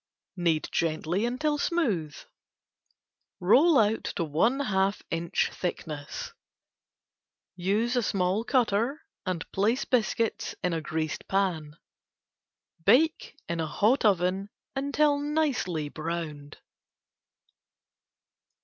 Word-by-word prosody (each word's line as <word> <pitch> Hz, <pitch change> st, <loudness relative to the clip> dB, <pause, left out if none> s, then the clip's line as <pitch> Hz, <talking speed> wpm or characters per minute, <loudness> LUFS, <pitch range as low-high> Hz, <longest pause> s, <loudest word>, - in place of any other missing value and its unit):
Knead 170 Hz, -4 st, +1 dB
gently 165 Hz, +5 st, 0 dB
until 295 Hz, +5 st, 0 dB
smooth. 210 Hz, -, 0 dB, 1.2 s
Roll 275 Hz, -, +5 dB
out 220 Hz, 0 st, +2 dB
to 175 Hz, -, 0 dB
one 170 Hz, -, +1 dB
half 195 Hz, -5 st, 0 dB
inch 165 Hz, 0 st, 0 dB
thickness. 155 Hz, -5 st, -5 dB, 1.2 s
Use 220 Hz, +7 st, +1 dB
small 195 Hz, +1 st, 0 dB
cutter 240 Hz, -, +1 dB, 0.2 s
and 180 Hz, -3 st, -2 dB
place 225 Hz, +7 st, +1 dB
biscuits 230 Hz, -2 st, 0 dB
in 180 Hz, -, +1 dB
greased 155 Hz, 0 st, -3 dB
pan. 170 Hz, -6 st, -1 dB, 1.1 s
Bake 300 Hz, -, +3 dB
in 170 Hz, -1 st, -2 dB
a 160 Hz, -, -1 dB
hot 215 Hz, -, +2 dB
oven 190 Hz, -1 st, +2 dB, 0.3 s
until 285 Hz, +1 st, +2 dB
nicely 285 Hz, -, 0 dB
browned. 155 Hz, -2 st, -5 dB
195 Hz, 90 wpm, -28 LUFS, 165-250 Hz, 1.2 s, Roll